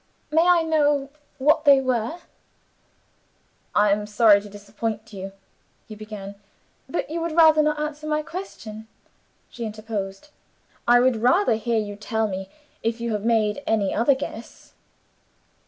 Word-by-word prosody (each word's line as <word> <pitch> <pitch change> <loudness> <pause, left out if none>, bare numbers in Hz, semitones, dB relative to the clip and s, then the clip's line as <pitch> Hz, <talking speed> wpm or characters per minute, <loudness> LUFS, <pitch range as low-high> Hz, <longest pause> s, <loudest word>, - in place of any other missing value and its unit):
"May 320 +2 +4
I 350 -1 +4
know 295 -3 +1 0.3
what 295 +3 +3
they 280 -3 +7
were?" 255 +2 -1 1.6
"I 205 0 +4
am 210 +1 0
sorry 210 -1 +5
to 205 - -11
disappoint 210 +2 -6
you," 195 0 -7 0.6
he 220 - -9
began. 210 -2 -8 0.6
"But 310 - -3
you 335 +1 -2
would 335 -1 -2
rather 315 -2 +6
not 300 0 0
answer 300 0 -4
my 305 0 0
question," 225 - -8 0.6
she 235 - -8
interposed. 215 +1 -5 0.6
"I 240 0 +6
would 250 -1 +3
rather 250 - +3
hear 225 +1 -1
you 205 -2 -3
tell 220 +1 -1
me 190 -1 -5 0.3
if 230 +1 -2
you 235 0 -3
have 210 -1 -3
made 220 +1 +1
any 210 -3 +1
other 250 +5 +3
guess." 235 -4 -9
230 Hz, 145 wpm, -23 LUFS, 210-295 Hz, 1.6 s, they